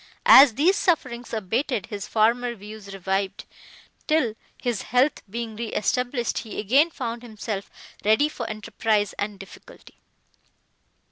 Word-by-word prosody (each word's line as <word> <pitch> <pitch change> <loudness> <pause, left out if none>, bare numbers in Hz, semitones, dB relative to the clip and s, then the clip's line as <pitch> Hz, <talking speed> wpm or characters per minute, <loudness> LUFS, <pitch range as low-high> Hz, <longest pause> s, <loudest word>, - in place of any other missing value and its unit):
As 265 -4 +9
these 340 +9 +3
sufferings 255 -9 0
abated, 225 +2 -1
his 205 -3 -6
former 235 +2 +1
views 210 -1 -10
revived, 195 +1 -2 0.6
till, 305 -8 +2 0.3
his 240 -5 -2
health 255 +4 +1
being 230 +1 -5
re 230 +1 -4
established, 245 +1 -1
he 220 - -7
again 270 - +4
found 235 -6 -5
himself 215 -3 -6 0.3
ready 220 +8 +4
for 245 -7 -6
enterprise 215 -1 -1
and 205 0 -3
difficulty. 195 - -14
230 Hz, 125 wpm, -24 LUFS, 210-250 Hz, 0.6 s, As